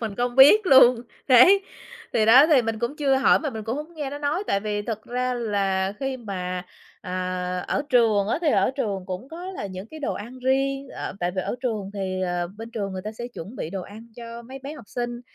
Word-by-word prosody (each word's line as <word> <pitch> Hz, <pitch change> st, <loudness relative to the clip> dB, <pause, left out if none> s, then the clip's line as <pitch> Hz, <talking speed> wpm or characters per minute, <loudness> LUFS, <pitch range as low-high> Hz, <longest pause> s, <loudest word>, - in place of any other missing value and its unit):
Mình 220 Hz, -4 st, -4 dB
không 245 Hz, +1 st, -1 dB
biết 370 Hz, +10 st, +8 dB
luôn. 250 Hz, -4 st, +7 dB, 0.3 s
Đấy. 310 Hz, +11 st, +7 dB, 0.5 s
Thì 220 Hz, -, +2 dB
đó 255 Hz, +6 st, +8 dB
thì 295 Hz, -6 st, +4 dB
mình 225 Hz, -1 st, -3 dB
cũng 235 Hz, +6 st, -3 dB
chưa 275 Hz, -3 st, +2 dB
hỏi 265 Hz, -, +4 dB
mà 300 Hz, -3 st, -3 dB
mình 220 Hz, -2 st, -7 dB
cũng 230 Hz, +3 st, -2 dB
hổng 305 Hz, +3 st, -7 dB
nghe 295 Hz, -4 st, -4 dB
nó 290 Hz, -, -6 dB
nói, 295 Hz, +6 st, -1 dB
tại 200 Hz, -, +1 dB
vì 205 Hz, 0 st, -2 dB
thật 220 Hz, -1 st, -5 dB
ra 250 Hz, +1 st, -2 dB
là 195 Hz, -4 st, 0 dB
khi 270 Hz, -1 st, -2 dB
mà, 185 Hz, -5 st, -5 dB, 0.4 s
à, 180 Hz, 0 st, -3 dB
ở -, -, 0 dB
trường 220 Hz, -5 st, +3 dB
á 235 Hz, -, 0 dB
thì 330 Hz, -, +1 dB
ở -, -, +3 dB
trường 200 Hz, -8 st, -2 dB
cũng 185 Hz, +7 st, -6 dB
có 335 Hz, +3 st, -8 dB
là 205 Hz, -, -5 dB
những 185 Hz, +2 st, -8 dB
cái 315 Hz, -1 st, -9 dB
đồ 280 Hz, -, -1 dB
ăn 240 Hz, +5 st, -8 dB
riêng, 270 Hz, +2 st, 0 dB
ờ, -, -, -6 dB
tại 175 Hz, 0 st, 0 dB
vì 185 Hz, -, 0 dB
ở -, -, -3 dB
trường 215 Hz, -6 st, -2 dB
thì, 190 Hz, -2 st, -3 dB
ờ, 175 Hz, 0 st, -1 dB
bên 225 Hz, +1 st, -8 dB
trường 205 Hz, -4 st, -4 dB
người 185 Hz, -1 st, -5 dB
ta 215 Hz, -, -4 dB
sẽ 235 Hz, +2 st, -7 dB
chuẩn 205 Hz, +10 st, -8 dB
bị 155 Hz, -, -5 dB
đồ 190 Hz, -1 st, -4 dB
ăn 220 Hz, +5 st, -11 dB
cho 235 Hz, 0 st, -8 dB
mấy 260 Hz, +3 st, -10 dB
bé 275 Hz, +3 st, -8 dB
học 275 Hz, -8 st, -12 dB
sinh. 240 Hz, 0 st, -4 dB
235 Hz, 240 wpm, -24 LUFS, 200-270 Hz, 0.5 s, biết